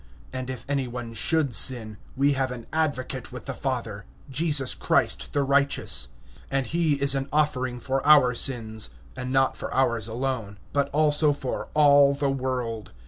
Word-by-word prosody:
And 130 Hz, 0 st, -5 dB
if 130 Hz, -2 st, -6 dB
any 140 Hz, -2 st, -1 dB
one 120 Hz, -1 st, -7 dB
have 155 Hz, -6 st, +1 dB
sinned, 110 Hz, -4 st, +3 dB, 0.2 s
we 140 Hz, +1 st, +3 dB
have 135 Hz, -1 st, -1 dB
an 120 Hz, -2 st, -7 dB
advocate 135 Hz, -5 st, -2 dB
with 125 Hz, -4 st, -9 dB
the -, -, -4 dB
Father, 115 Hz, -7 st, -4 dB, 0.3 s
Jesus 145 Hz, -2 st, +1 dB
Christ -, -, 0 dB
the 145 Hz, -, 0 dB
righteous. 140 Hz, -, +2 dB, 0.4 s
(2)And 135 Hz, 0 st, 0 dB
he 165 Hz, 0 st, +1 dB
is 140 Hz, -1 st, +3 dB
a 135 Hz, -, +1 dB
propitiation 140 Hz, -4 st, -1 dB
for 135 Hz, +2 st, -2 dB
our 145 Hz, -5 st, +6 dB
sins; 115 Hz, -3 st, -1 dB, 0.3 s
and 130 Hz, 0 st, -5 dB
not 135 Hz, 0 st, +2 dB
for -, -, -6 dB
ours 120 Hz, -4 st, 0 dB
only, 115 Hz, -3 st, -3 dB, 0.2 s
but 140 Hz, -1 st, +1 dB
also 150 Hz, 0 st, +3 dB
for 135 Hz, -3 st, -5 dB
the -, -, +1 dB
whole 140 Hz, -1 st, +6 dB, 0.2 s
world. 125 Hz, -, -4 dB
130 Hz, 165 wpm, -25 LUFS, 125-140 Hz, 0.4 s, our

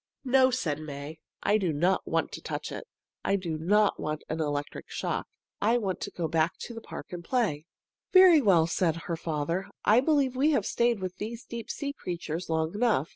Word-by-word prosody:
"No!" 260 Hz, 0 st, +5 dB
said 170 Hz, -, -1 dB
May. 150 Hz, +1 st, -7 dB, 0.2 s
"I 210 Hz, +1 st, +3 dB
don't 175 Hz, 0 st, +1 dB
want -, -, 0 dB
to -, -, -7 dB
touch -, -, -4 dB
it. -, -, -7 dB, 0.4 s
I -, -, +2 dB
don't 185 Hz, +3 st, +1 dB
want 155 Hz, 0 st, -3 dB
an 160 Hz, +1 st, -2 dB
electric 145 Hz, -1 st, -3 dB
shock. -, -, -3 dB, 0.3 s
I 225 Hz, +4 st, +3 dB
want 195 Hz, -6 st, -2 dB
to -, -, -3 dB
go 170 Hz, -2 st, -3 dB
back 160 Hz, +1 st, +1 dB
to 240 Hz, -, -6 dB
the 230 Hz, -, -7 dB
park -, -, -9 dB
and 175 Hz, -1 st, -6 dB
play." 180 Hz, -, 0 dB, 0.5 s
"Very 370 Hz, -5 st, +8 dB
well," 180 Hz, -8 st, +5 dB
said 165 Hz, -1 st, +1 dB
her 170 Hz, -, -2 dB
father. 165 Hz, +3 st, -2 dB, 0.2 s
"I 220 Hz, +3 st, +6 dB
believe 275 Hz, -2 st, +2 dB
we 295 Hz, +4 st, +3 dB
have 220 Hz, -8 st, +1 dB
stayed 235 Hz, -3 st, +1 dB
with 185 Hz, 0 st, -4 dB
these 230 Hz, +2 st, -6 dB
deep 230 Hz, -2 st, -7 dB
sea 280 Hz, -1 st, -3 dB
creatures 170 Hz, -, -5 dB
long 160 Hz, 0 st, 0 dB
enough. 210 Hz, -, +1 dB
185 Hz, 190 wpm, -28 LUFS, 160-235 Hz, 0.5 s, Very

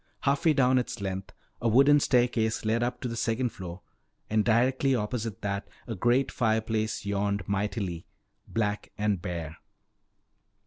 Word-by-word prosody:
Half 140 Hz, +5 st, +1 dB
way 160 Hz, -, +6 dB
down 130 Hz, -2 st, +4 dB
its 120 Hz, -1 st, -4 dB
length 95 Hz, -1 st, -4 dB, 0.3 s
a 120 Hz, -, +1 dB
wooden 140 Hz, +6 st, +6 dB
staircase 120 Hz, -5 st, +1 dB
led 115 Hz, +2 st, +1 dB
up 125 Hz, +1 st, -2 dB
to -, -, -2 dB
the 115 Hz, -, -4 dB
second 115 Hz, +2 st, 0 dB
floor, 90 Hz, -3 st, -8 dB, 0.5 s
and 110 Hz, 0 st, +3 dB
directly 130 Hz, +4 st, +3 dB
opposite 110 Hz, -1 st, -3 dB
that 100 Hz, 0 st, -2 dB, 0.2 s
a 115 Hz, -, -4 dB
great 120 Hz, +6 st, +2 dB
fireplace 110 Hz, -1 st, 0 dB
yawned 100 Hz, -1 st, -1 dB
mightily, 100 Hz, -3 st, -2 dB, 0.4 s
black 105 Hz, -2 st, -1 dB
and 105 Hz, -3 st, 0 dB
bare. 85 Hz, -3 st, -5 dB
110 Hz, 145 wpm, -28 LUFS, 100-125 Hz, 0.5 s, way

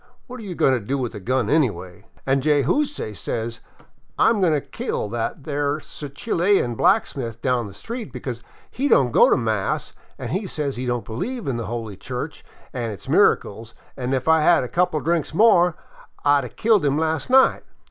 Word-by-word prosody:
What 255 Hz, -1 st, -9 dB
are -, -, -9 dB
you 190 Hz, -4 st, -6 dB
goin' 135 Hz, -, +3 dB
to 125 Hz, -, +1 dB
do 130 Hz, +6 st, -3 dB
with 125 Hz, -3 st, -3 dB
a 105 Hz, -, -7 dB
gun 125 Hz, +3 st, 0 dB
anyway? 100 Hz, -, -1 dB
' -, -, -30 dB
An' 135 Hz, 0 st, +2 dB
Jayzoose 150 Hz, -, +1 dB
says, 115 Hz, +6 st, -4 dB, 0.3 s
* -, -, -39 dB
I -, -, +5 dB
'm 220 Hz, -3 st, +1 dB
goin' 180 Hz, -3 st, +3 dB
to 150 Hz, -, +2 dB
kill 120 Hz, -, -4 dB
that 120 Hz, +5 st, -3 dB
there 145 Hz, 0 st, -1 dB
Chilian 155 Hz, -, -1 dB
blacksmith 120 Hz, -, +1 dB
down 125 Hz, -4 st, +1 dB
the 100 Hz, -, -11 dB
street, 230 Hz, -, -7 dB
because 125 Hz, -2 st, -6 dB, 0.3 s
he 275 Hz, +4 st, -1 dB
don't 130 Hz, -, +4 dB
go -, -, +6 dB
to -, -, +4 dB
mass 110 Hz, -5 st, -2 dB, 0.2 s
an' 195 Hz, +3 st, -3 dB
says 145 Hz, -5 st, -2 dB
he 125 Hz, +1 st, -4 dB
don't 120 Hz, -3 st, -2 dB
believe 205 Hz, -, -4 dB
in 130 Hz, -3 st, -1 dB
the 115 Hz, -, -4 dB
Holy 115 Hz, -4 st, -5 dB
Church 130 Hz, +8 st, -6 dB, 0.3 s
an' 120 Hz, -3 st, -3 dB
its 100 Hz, -5 st, -9 dB
miracles; 110 Hz, +3 st, +2 dB, 0.2 s
an' 130 Hz, -1 st, -3 dB
if 130 Hz, +2 st, -3 dB
I 160 Hz, 0 st, +5 dB
'd -, -, 0 dB
a -, -, +1 dB
had 175 Hz, -6 st, +5 dB
a -, -, -3 dB
couple 180 Hz, -2 st, +1 dB
of -, -, -4 dB
drinks 165 Hz, -2 st, 0 dB
more, 180 Hz, -5 st, +5 dB, 0.5 s
I 145 Hz, 0 st, +5 dB
'd -, -, -6 dB
a -, -, -7 dB
killed 215 Hz, -, +2 dB
him 140 Hz, 0 st, +1 dB
las' 160 Hz, +6 st, -1 dB
night.' 265 Hz, +1 st, +5 dB
140 Hz, 210 wpm, -22 LUFS, 120-170 Hz, 0.5 s, go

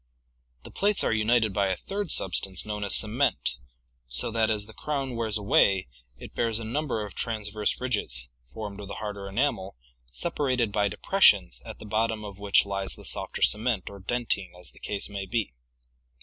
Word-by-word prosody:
The -, -, -11 dB
plates 205 Hz, +1 st, +3 dB
are -, -, +2 dB
united 110 Hz, -1 st, +3 dB
by 100 Hz, 0 st, +2 dB
a 95 Hz, -, 0 dB
third 200 Hz, -2 st, -4 dB
substance 95 Hz, -2 st, +1 dB
known 105 Hz, -1 st, -3 dB
as 100 Hz, -, +5 dB
cement 115 Hz, +6 st, +2 dB, 0.6 s
so -, -, -1 dB
that 110 Hz, -1 st, +2 dB
as 105 Hz, -2 st, 0 dB
the 110 Hz, -, -13 dB
crown 135 Hz, -3 st, -3 dB
wears 110 Hz, -2 st, 0 dB
away 95 Hz, -4 st, +3 dB, 0.3 s
it -, -, -10 dB
bears 115 Hz, -2 st, +1 dB
a -, -, -5 dB
num 145 Hz, +8 st, -2 dB
ber 110 Hz, -5 st, -1 dB
of 100 Hz, -, -9 dB
transverse 105 Hz, -2 st, -2 dB
ridges, 100 Hz, -, -1 dB, 0.2 s
formed 105 Hz, -2 st, -6 dB
of 100 Hz, -, -7 dB
the -, -, -6 dB
harder 100 Hz, -2 st, -5 dB
enamel, 95 Hz, -, -1 dB, 0.3 s
separated 130 Hz, -, 0 dB
by 100 Hz, 0 st, +2 dB
depressions 60 Hz, -8 st, +4 dB
at -, -, -7 dB
the -, -, -11 dB
bottom 110 Hz, +1 st, 0 dB
of 100 Hz, -1 st, -9 dB
which 100 Hz, -1 st, +4 dB
lies 100 Hz, -1 st, -3 dB
the -, -, -11 dB
softer -, -, -2 dB
cement 105 Hz, -4 st, +2 dB
or 100 Hz, -, -10 dB
dentine 105 Hz, -1 st, -1 dB
as 90 Hz, -, -9 dB
the -, -, -19 dB
case 100 Hz, -1 st, -2 dB
may 100 Hz, -1 st, -5 dB
be. 110 Hz, -, -1 dB
105 Hz, 185 wpm, -27 LUFS, 100-115 Hz, 0.6 s, as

